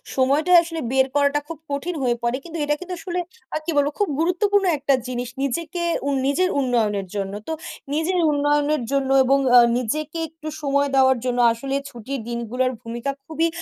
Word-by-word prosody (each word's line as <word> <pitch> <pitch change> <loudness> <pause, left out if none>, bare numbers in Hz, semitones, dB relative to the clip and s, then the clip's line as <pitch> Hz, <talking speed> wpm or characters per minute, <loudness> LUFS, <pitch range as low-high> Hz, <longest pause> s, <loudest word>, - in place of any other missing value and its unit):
সময়টা 280 +6 +2
আসলে 330 -1 -5
বের 265 0 +3
করাটা 285 0 +3
খুব 330 -2 -7
কঠিন 330 +5 -2
হয়ে 240 -1 +2
পড়ে। 235 +2 +1
কিন্তু 335 -1 -7
এটা 295 0 +1
কিন্তু 365 0 -6
আসলে 355 +1 -3 0.4
আ - - +2
কি 340 - -1
বলব 285 0 +3
খুব 410 - +2
গুরুত্বপূর্ণ 390 +4 +2
একটা 280 0 +1
জিনিস 245 -1 -3
নিজেকে 335 +5 -2 0.3
উ - - +2 0.2
নিজের 330 +7 +2
উন্নয়নের 220 -7 0
জন্য। 195 -1 -3
তো 320 - -2 0.4
নিজের 330 +4 0
উন্নয়নের 290 0 +1
জন্য 275 -1 +1
এবং 275 +2 +3 0.2
আ - - +10 0.2
নিজেকে 305 +7 -2
একটু 315 0 -11
সময় 280 0 +1
দেওয়ার 265 -1 +5
জন্য 245 -1 0
আসলে 270 +4 -3
ছুটির 255 +4 -6
দিনগুলোর 240 +2 -1
ভূমিকা 235 +4 -4
খুবই 320 +2 0
280 Hz, 175 wpm, -22 LUFS, 255-320 Hz, 0.4 s, আ